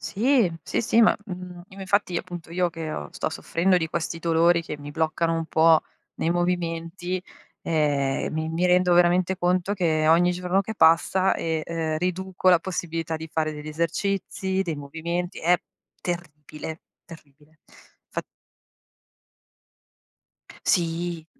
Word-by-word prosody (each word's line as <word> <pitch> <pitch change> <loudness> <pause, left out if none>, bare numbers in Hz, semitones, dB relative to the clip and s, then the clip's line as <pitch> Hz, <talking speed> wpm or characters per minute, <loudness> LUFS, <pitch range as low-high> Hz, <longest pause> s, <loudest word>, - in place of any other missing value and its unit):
Sì, 230 -1 +2
sì, - - -1
sì, 230 0 +4
ma, 220 - +6
mhmm, 180 -3 -8
im 195 0 -12
infatti 190 -1 +1
appunto 175 -2 -6
io 175 0 +1
che, 165 -1 -6
uhm, 75 - -5
sto - - -2
soffrendo 180 +3 +1
di 160 -2 0
questi 165 +1 -3
dolori 170 +1 +3
che 150 -2 -6
mi 145 0 -8
bloccano 160 +2 0
un 165 0 -1
po' 160 0 +4 0.3
nei 165 - -1
movimenti, 175 +1 -2 0.4
ehm, 145 -4 0
mi 160 0 -2
mi 165 +2 -1
rendo 180 0 +4
veramente 175 +1 +3
conto 180 +2 +1
che 160 -4 +1
ogni 175 +2 +5
giorno 180 +2 0
che 220 +3 -6
passa, 170 +3 +4
e, 160 -1 -2
ehm, 160 -1 -2
riduco 185 +2 -1
la 180 -2 +7
possibilità 165 -3 -3
di 160 0 -8
fare 155 -1 0
degli 150 0 -8
esercizi, 190 +4 -1
dei 165 -5 -3
movimenti. 165 +5 -4
È 175 +2 +4 0.4
terribile, 160 -2 -6 0.2
terribile. 155 -2 -16 0.5
Fat - - -4 2.4
Sì, 170 -1 0
170 Hz, 140 wpm, -25 LUFS, 160-180 Hz, 2.4 s, la